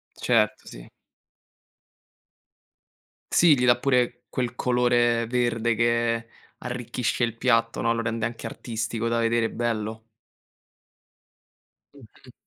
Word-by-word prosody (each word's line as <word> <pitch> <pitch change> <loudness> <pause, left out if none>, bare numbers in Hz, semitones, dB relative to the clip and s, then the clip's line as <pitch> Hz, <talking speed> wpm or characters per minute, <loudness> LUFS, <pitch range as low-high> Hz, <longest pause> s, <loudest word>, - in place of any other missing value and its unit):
Certo, 115 -4 +1
sì. - - -11 2.4
Sì 160 -5 +5
gli 125 - +1
dà 120 -1 +5
pure 125 -2 0
quel 125 -2 -2
colore 120 -2 +2
verde 120 -1 0
che 115 0 +1 0.3
arricchisce 125 0 -3
il 115 -1 -1
piatto, 115 -2 +1
no. 115 - +2
Lo 115 - -2
rende 115 0 -2
anche 115 0 -6
artistico 115 0 -4
da 115 0 0
vedere, 115 0 +1
bello. 110 -1 -3 1.9
Mh-mh. 125 -1 -18
115 Hz, 105 wpm, -25 LUFS, 115-125 Hz, 2.4 s, Sì